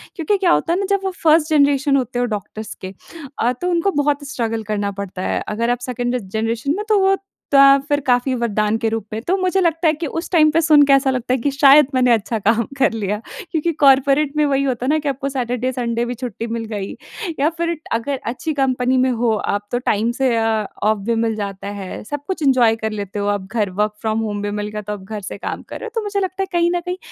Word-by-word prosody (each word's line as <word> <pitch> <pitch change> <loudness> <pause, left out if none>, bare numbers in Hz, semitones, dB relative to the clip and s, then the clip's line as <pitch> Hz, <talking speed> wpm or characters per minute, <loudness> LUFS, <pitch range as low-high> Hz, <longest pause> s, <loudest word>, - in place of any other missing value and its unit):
क्योंकि 380 +5 0
क्या 370 -3 +2
होता 340 - +2
है 360 - 0
ना 395 - -1
जब 395 - -1
वो 385 - -1
फर्स्ट 315 0 +4
जनरेशन 285 -1 +3
होते 250 -2 -2
हो 245 - +2
डॉक्टर्स 215 +2 -7
के 190 +1 -7 0.5
अ, 240 - +2
तो 360 - 0
उनको 350 +3 +1
बहुत 290 -1 0
स्ट्रगल 225 -3 -2
करना 205 -1 -2
पड़ता 190 -2 -6
है। - - -1
अगर 230 +3 -1
आप 245 0 0
सेकंड 245 0 -2
जनरेशन 225 +6 -1
में 420 - -4
तो 425 -2 +4
वो 385 0 +4 0.4
त 275 - +7 0.3
फिर 290 -1 +1
काफ़ी 255 0 +1
वरदान 215 -1 +1
के 225 0 0
रूप 225 -1 -3
में, 220 - -3
तो 355 +10 0
मुझे 370 +1 +1
लगता 330 -1 +1
है 310 - +4
कि 320 +1 -4
उस 330 +4 -4
टाइम 310 -3 +5
पे 320 - +2
सुन 300 -2 +6
के 275 - +5
ऐसा 275 0 +4
लगता 250 -1 -1
है 260 - +2
कि 280 +5 0
शायद 280 0 +6
मैंने 250 -1 +4
अच्छा 225 +1 -1
काम 225 +3 +2 0.2
कर 270 - +3
लिया। 210 -1 -2 0.3
क्योंकि 335 0 0
कॉर्पोरेट 275 +2 +4
में 300 - +4
वही 275 -1 +1
होता 255 -2 -1
है - - 0
ना 310 +1 +3
कि 295 - -2
आपको 275 0 -3
सैटरडे, 250 -1 -2
संडे 235 -2 -2
भी 245 - -3
छुट्टी 235 -2 -5
मिल 230 0 -3
गई 200 -2 -4 0.4
या 295 +3 +3
फिर 340 0 -1 0.2
अगर 260 +4 -1
अच्छी 250 +7 -3
कंपनी 260 -2 +1
में 260 0 +3
हो 235 -1 +1
आप 205 0 -2
तो 245 - 0
टाइम 225 -1 0
से 255 -3 +3
अ, 225 -1 +1 0.2
ऑफ 215 +1 +3
भी 235 - +2
मिल 225 -1 0
जाता 200 -2 -5
है। 185 - -7
सब 290 +6 -6
कुछ 370 -5 -3
एन्जॉय 250 -5 +4
कर 220 - 0
लेते 205 -1 -5
हो 205 - -1
आप 190 - -11
घर 215 -4 0
वर्क 210 0 0
फ्रॉम 220 0 -1
होम 210 -2 -3
भी 205 0 -3
मिल 205 - -3
गया 210 0 -5
तो 210 0 -5
आप 200 - -8
घर 210 +1 -6
से 200 - -7
काम - - -5
कर - - -6
रहे - - -7
हो, - - -9
तो 450 - -1
मुझे 410 -1 -2
लगता 380 0 -2
है - - -4
कहीं 345 -1 +2
न - - +1
कहीं 360 +1 -3
250 Hz, 255 wpm, -19 LUFS, 220-295 Hz, 0.5 s, त